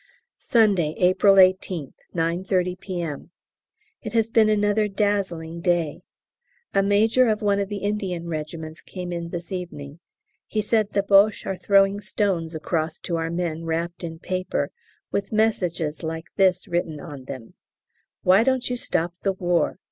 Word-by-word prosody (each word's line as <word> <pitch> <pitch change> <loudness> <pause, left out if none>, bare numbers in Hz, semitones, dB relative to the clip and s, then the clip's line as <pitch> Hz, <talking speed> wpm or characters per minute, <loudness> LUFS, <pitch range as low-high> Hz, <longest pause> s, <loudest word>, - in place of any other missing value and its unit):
Sunday, 195 -9 +2
April 185 +2 +5
18th, 185 -5 +3 0.2
9.30 180 +2 0
P.M. 175 -7 -5 0.7
It - - -6
has 225 -1 +1
been 220 -2 +5
another 210 0 +2
dazzling 195 -5 -1
day. 170 -4 0 0.7
A 195 - +4
major 220 +5 +3
of 215 0 0
one 200 -1 +2
of 200 -1 -2
the 205 -2 -5
Indian 195 -5 -2
regiments 160 0 -5
came 180 -2 -6
in 170 -1 -4
this 170 +1 -6
evening. 165 -5 -6 0.5
He 215 - -2
said 215 0 +1
the 200 - +2
Boches 200 +1 +4
are 195 - -2
throwing 195 +1 +3
stones 190 -6 -1
across 160 0 -2
to 170 - -2
our 165 0 -2
men 165 -1 -2
wrapped 170 +2 -3
in 165 -1 -5
paper 185 +2 -2 0.4
with 200 0 -2
messages 180 -8 0
like 160 0 -5
this 190 -2 +3
written 170 -3 -2
on 145 -5 -9
them, 130 -4 -8 0.7
"Why 185 +3 +6
don't 255 -1 0
you 245 - -1
stop 170 -7 -1
the 195 - +1
War? 175 -2 0
180 Hz, 150 wpm, -24 LUFS, 165-205 Hz, 0.7 s, Why